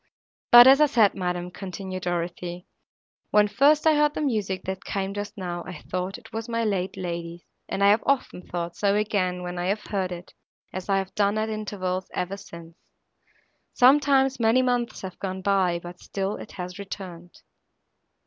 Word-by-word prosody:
But, 240 0 +11
as 270 +3 +7
I 300 - +7
said, 225 -7 +4
madam," 180 -1 -3
continued 185 0 -6
Dorothée, 175 0 -3 0.6
"when 210 0 +4
first 285 +9 +3
I 315 - +6
heard 295 0 +2
the - - -2
music, 210 -9 -1
that 190 0 -5
came 195 0 -3
just 205 +2 -6
now, 175 -2 -4
I 180 - -7
thought 185 +3 -4
it 235 -2 -17
was 225 +1 -5
my 230 0 0
late 195 -3 -1
lady's, 170 -1 -5 0.3
and 195 - -1
I 200 - +7
have 210 - +3
often 275 -9 0
thought 175 -1 -5
so 200 -1 +1
again, 185 -4 0
when 180 0 -5
I 175 - -1
have 205 +2 0
heard 190 -3 -2
it, 175 0 -8 0.4
as 185 +1 -6
I 195 - +3
have 190 -1 -3
done 205 0 +1
at 220 0 -1
intervals, 190 -4 -3
ever 185 +2 -2
since. 170 -4 -12 1.0
Sometimes, 270 0 +4
many 230 +3 +4
months 245 -2 -1
have 185 -1 -7
gone 190 -1 -4
by, 190 -3 +2
but 175 +1 -10
still 195 +1 -3
it - - -10
has 180 +1 -7
returned." 180 -3 -9
195 Hz, 180 wpm, -25 LUFS, 180-220 Hz, 1.0 s, But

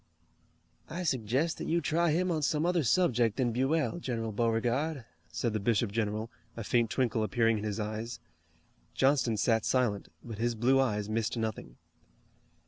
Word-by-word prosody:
"I 180 +3 -4
suggest 130 +2 0
that - - -4
you 170 - +2
try 170 +2 +1
him 180 +4 +1
on 160 -2 0
some 150 +2 +1
other 175 -1 +2
subject 120 - +2
than 125 -3 +1
Buell, 150 +8 0
General 115 -7 -3
Beauregard," 120 +6 0 0.3
said 115 +6 -1
the 110 - 0
bishop 110 0 +1
general, 110 +1 -2 0.3
a 115 - -4
faint 115 +1 +2
twinkle 115 -3 0
appearing 115 +1 +2
in - - -6
his 105 0 -3
eyes. 110 +3 -4 0.8
Johnston 135 -5 +2
sat 110 0 +2
silent, 120 -6 +1 0.2
but 115 -3 -8
his 120 0 0
blue 125 +4 +3
eyes 105 -6 0
missed 110 +2 -1
nothing. 110 - -4
120 Hz, 160 wpm, -30 LUFS, 110-135 Hz, 0.8 s, blue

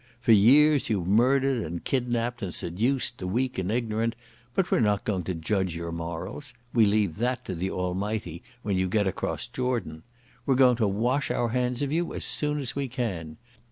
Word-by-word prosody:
For 115 - +2
years 140 +8 +6
you've 100 -6 0
murdered 130 +5 +3
and 85 +2 -5
kidnapped 120 -2 -1
and 95 -4 -3
seduced 120 +10 -1
the 90 - -4
weak 125 +4 -1
and 95 +2 -1
ignorant, 115 -1 -1 0.4
but 190 - +1
we're - - +4
not 105 -3 +2
going 100 -4 -1
to 95 - -2
judge 95 +1 -1
your 85 0 -4
morals. 85 - -6 0.2
We 115 -3 +5
leave 100 -5 +1
that 125 +2 -1
to - - -4
the 90 +2 -2
Almighty 90 -1 -3 0.2
when 100 -2 0
you 95 0 +1
get 105 +2 +2
across 95 - -2
Jordan. 120 -12 -3 0.5
We're 135 - +4
going 125 -2 +5
to 110 -3 +2
wash 120 +8 0
our 120 - 0
hands 125 +2 0
of 140 - -2
you 170 +2 -1
as - - -4
soon 150 0 0
as 135 -4 -3
we 140 -1 -1
can. 95 - -4
110 Hz, 195 wpm, -27 LUFS, 95-125 Hz, 0.5 s, years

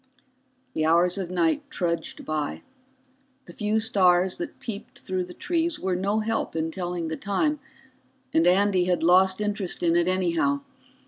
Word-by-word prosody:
The 155 - -1
hours 175 +4 +3
of 185 -3 -4
night 175 - +1
trudged 170 -2 -3
by. 155 -2 -3 0.8
The 175 - -12
few 210 +3 0
stars 185 -5 +3
that 345 -4 -6
peeped 230 +3 -7
through 185 -5 -3
the 180 - -10
trees 340 -2 -1
were 185 -1 -1
no 200 +4 0
help 225 -3 -2
in 160 0 -1
telling 175 -2 -3
the 160 0 -4
time, 295 +10 0 0.7
and 165 +2 +4
Andy 190 0 +3
had 180 -2 0
lost 185 +3 +5
interest 210 -4 -2
in 170 -1 +3
it 175 0 +3
anyhow. 185 +10 +1
185 Hz, 155 wpm, -25 LUFS, 175-210 Hz, 0.8 s, lost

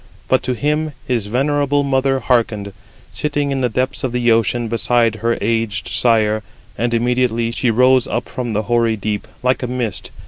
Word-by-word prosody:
But 130 - +3
to 125 - +1
him 150 +5 -1
his 115 -5 -1
venerable 145 +4 +1
mother 135 -1 +1
hearkened, 110 -5 0 0.4
sitting 145 -1 -1
in 135 -1 -1
the 125 - +1
depths 130 +4 -2
of 130 -2 -2
the 120 -1 +2
ocean 115 +1 +1
beside 115 0 +1
her 115 +2 0
aged 115 -3 -1
sire. 110 -3 +2 0.3
And 120 0 0
immediately 120 -1 +1
she 120 +1 0
rose 125 +2 +4
up 120 - -2
from 120 -3 -4
the 105 +1 0
hoary 115 0 +1
deep, 105 0 -3 0.2
like 130 +1 +1
a 125 - -2
mist. 120 -5 -3
120 Hz, 175 wpm, -18 LUFS, 115-130 Hz, 0.4 s, rose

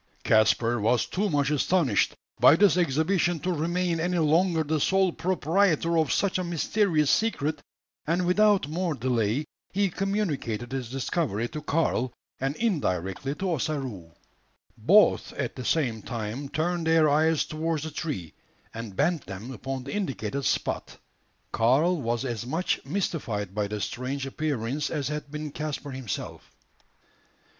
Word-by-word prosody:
Caspar 115 +2 +3
was 115 +4 +2
too 205 +2 -1
much 145 -3 +1
astonished 150 - +2 0.2
by 145 - +8
this 195 0 +5
exhibition 175 +2 +1
to 180 0 0
remain 170 +1 0
any 175 +2 0
longer 165 +1 +3
the 155 +1 0
sole 190 +4 +3
proprietor 170 -1 +1
of 155 -3 +1
such 195 -2 +1
a - - -1
mysterious 170 -2 +1
secret, 155 -9 0 0.5
and 175 +3 +1
without 200 -2 +4
more 165 +1 -1
delay 120 +1 0 0.3
he 200 -1 +1
communicated 160 - -2
his 130 -3 -3
discovery 130 - -1
to 155 -1 -6
Karl, 145 -5 0 0.3
and 135 +2 -1
indirectly 135 - -1
to 190 +3 -2
Ossaroo. 130 - -3 0.6
Both - - +4
at - - -3
the 130 - -6
same 120 -6 0
time 120 +4 -5
turned 170 +2 -1
their 160 -1 +5
eyes 155 +2 +3
towards 160 0 -2
the 160 - -5
tree, 140 - -4 0.4
and 115 -4 -7
bent 165 - 0
them 100 +6 -7
upon 130 +2 -5
the 140 - -6
indicated 140 - -2
spot. - - -1 0.5
Karl 145 +9 +3
was 120 +1 -1
as 120 -4 -3
much 160 +9 -1
mystified 115 - -2
by 105 0 -1
the 105 +1 -4
strange 130 +5 -3
appearance 140 -1 -2
as 145 -3 -2
had 150 -1 -4
been 150 0 -5
Caspar 145 -1 -4
himself. 130 -5 -6
150 Hz, 145 wpm, -27 LUFS, 125-170 Hz, 0.6 s, by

